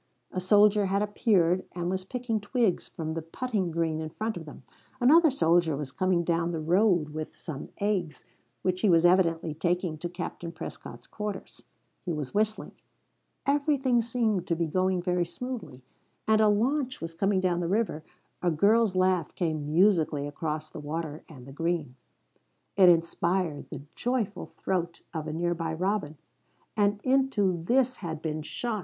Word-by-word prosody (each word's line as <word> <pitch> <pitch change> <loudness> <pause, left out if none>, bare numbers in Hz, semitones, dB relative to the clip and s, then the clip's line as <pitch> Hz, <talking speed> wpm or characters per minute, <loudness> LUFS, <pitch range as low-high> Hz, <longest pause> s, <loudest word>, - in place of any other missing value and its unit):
A 185 - -3
soldier 205 +1 +5
had 200 +2 +1
appeared 190 -4 +2
and 175 -1 -3
was 185 0 -2
picking 235 -1 -2
twigs 210 -2 0
from 160 -1 -4
the 165 - -3
putting 195 +3 -2
green 160 -1 -1
in 155 - -4
front 220 +6 -3
of 165 - -7
them; 150 -2 -11 0.4
another 315 +6 +6
soldier 170 - +2
was 140 -3 -5
coming 180 +4 +1
down 170 0 0
the 165 -2 -2
road 175 0 +2
with 155 +1 -6
some 150 -5 -7
eggs 185 -8 -1 0.4
which 185 0 0
he 215 - +3
was 170 -1 +5
evidently 170 -3 +3
taking 170 0 -1
to 175 - -4
Captain 175 -1 -6
Prescott's 165 -1 -9
quarters. 210 -2 -6 0.4
He 175 - -2
was 150 -4 -4
whistling. 215 +1 0 0.7
Everything 280 -4 +2
seemed 225 -5 0
to 170 - +1
be 170 0 0
going 185 +2 0
very 180 -1 +1
smoothly. 175 - -7 0.4
And 220 0 +4
a 215 - +5
launch 255 +5 +1
was 165 0 -6
coming 195 +3 +1
down 180 -2 +1
the 175 - -1
river; 195 -5 0 0.4
a 180 - +2
girl's 205 +5 +3
laugh 185 -3 +1
came 155 -4 -2
musically 165 -5 +3
across 155 +1 -4
the - - -8
water 155 +1 -5
and 130 -6 -12
the 135 - -11
green; 165 -3 -2 0.8
it 185 -3 +7
inspired 170 -1 +1
the 140 - -7
joyful 230 -6 -2
throat 175 -2 -2
of 160 -2 -4
a - - -3
nearby 165 0 -1
robin. 180 -4 -1 0.6
And 205 -1 +2
into 255 -10 +2
this 255 0 +2
had 160 -3 -6
been 155 -1 -2
shot 220 +8 -3
180 Hz, 165 wpm, -28 LUFS, 160-210 Hz, 0.8 s, it